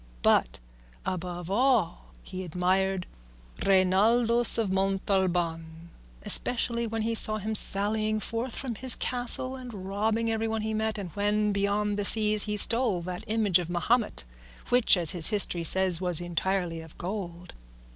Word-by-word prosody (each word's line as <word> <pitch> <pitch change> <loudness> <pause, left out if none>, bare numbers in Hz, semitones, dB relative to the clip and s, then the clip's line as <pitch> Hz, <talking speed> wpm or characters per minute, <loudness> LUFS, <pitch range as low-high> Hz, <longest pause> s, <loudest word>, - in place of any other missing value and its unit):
But - - +2 0.5
above 180 -1 -5
all 215 - 0 0.2
he 185 0 -8
admired 185 +2 -1 0.6
Reinaldos 220 +6 +3
of 220 -4 -1
Montalban, 175 -4 -2 0.3
especially 235 - -1
when 225 0 -4
he 230 +1 -2
saw 215 -1 +3
him 215 +1 -5
sallying 215 +1 0
forth 230 +3 -5
from 260 -4 -5
his 250 +3 +3
castle 250 +1 +2
and 240 -7 -10
robbing 220 +3 -1
everyone 225 0 -3
he 220 0 -3
met, 220 0 -2
and 190 -4 -7
when 210 +2 -1
beyond 205 +1 -2
the 205 - -2
seas 215 -1 +2
he 210 -1 -4
stole 225 -4 +3
that 180 +3 -7
image 210 -5 +1
of 175 -1 -6
Mahomet 210 - -1 0.5
which, 245 -5 +4
as 170 -3 +3
his 170 -3 +4
history 200 -5 +1
says, 185 +1 +4
was 180 -3 +2
entirely 175 0 -3
of 160 -1 -15
gold. 180 -2 -7
200 Hz, 145 wpm, -26 LUFS, 180-220 Hz, 0.6 s, which